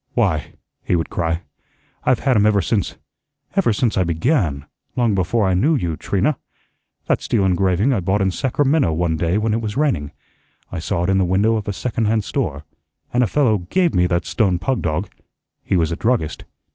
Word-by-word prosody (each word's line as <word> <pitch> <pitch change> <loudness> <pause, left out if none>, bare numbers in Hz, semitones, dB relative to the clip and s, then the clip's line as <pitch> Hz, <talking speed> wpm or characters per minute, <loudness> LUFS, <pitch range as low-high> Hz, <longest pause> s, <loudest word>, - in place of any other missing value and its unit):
"Why," - - 0 0.3
he - - +1
would 80 - -2
cry, 85 0 -1 0.6
"I've 130 - +2
had 135 -3 +2
'em 105 0 +4
ever 105 -1 +3
since 100 +1 -1 0.6
ever 195 -11 +3
since 110 +1 0
I - - +4
BEGAN; 85 - 0 0.3
long 120 -4 +2
before 100 +3 +1
I 95 - +2
knew 145 - +3
you, 85 - -1
Trina. 115 - 0 0.7
That - - +1
steel 95 - +1
engraving 95 +6 +2
I 115 - +1
bought 95 +3 0
in 95 - +1
Sacramento 135 - +1
one 85 0 0
day 85 +4 0
when 110 0 0
it 115 - 0
was 110 0 -4
raining. 130 - 0 0.6
I 90 - -4
saw 85 +1 -1
it 90 - +1
in 95 - +3
the - - +3
window 100 +5 +2
of 105 -2 -3
a - - 0
second 115 +2 -2
hand 110 0 +1
store, 70 -6 -3 0.5
and 125 - +3
a - - +2
fellow 120 -7 +2
GAVE 170 - 0
me 90 0 +3
that 85 -2 0
stone 95 +1 +1
pug 115 +8 -1
dog. 85 +5 -1 0.6
He 95 - +1
was 80 -1 +1
a - - -1
druggist. 110 -6 -1
100 Hz, 200 wpm, -20 LUFS, 85-115 Hz, 0.7 s, em